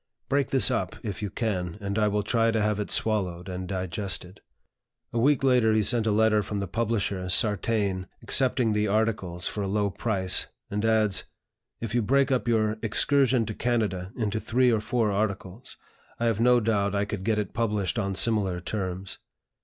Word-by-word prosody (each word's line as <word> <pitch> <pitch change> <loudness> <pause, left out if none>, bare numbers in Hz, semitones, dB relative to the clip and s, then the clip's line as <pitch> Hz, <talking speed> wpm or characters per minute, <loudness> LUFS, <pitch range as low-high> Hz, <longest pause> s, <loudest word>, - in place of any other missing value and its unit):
Break 140 +1 +1
this 135 -1 +4
up, 100 -7 -2
if 105 -1 -5
you 105 - -2
can, 90 -5 -3
and 100 +1 -2
I 105 - +3
will 105 0 0
try 115 +1 +2
to 115 -1 +1
have 105 -1 0
it 105 - -3
swallowed 95 -5 0
and 90 0 -5
digested." 95 0 -4 0.7
A 120 - 0
week 135 +2 +3
later 125 -4 +4
he 110 -1 +2
sent 115 +1 +4
a - - +3
letter 110 0 +3
from 105 0 -4
the 100 - -3
publisher, 100 -3 -2
Sartain, 100 -2 +1 0.2
accepting 125 -4 +2
the 105 0 +1
articles 100 -4 -1
for 105 - -3
a 100 - -2
low 100 0 0
price, 95 -3 0 0.2
and 105 +1 -2
adds: 110 -3 +2 0.6
"If 115 -2 -4
you 120 - +2
break 135 +5 +2
up 130 -2 0
your 110 -2 +1
'Excursion 130 +2 +3
to 110 - -4
Canada' 105 -6 -1
into 110 -2 -1
three 125 +3 +2
or 110 -2 +1
four 115 -1 0
articles, 100 +2 -4 0.4
I 120 - 0
have 115 -2 +1
no 125 +1 +5
doubt 105 -3 0
I 100 0 +1
could 100 -2 -5
get 110 +1 +1
it 105 -2 -3
published 105 -2 -1
on 100 -2 -2
similar 100 -5 +1
terms." 95 0 -5
105 Hz, 185 wpm, -26 LUFS, 100-115 Hz, 0.7 s, no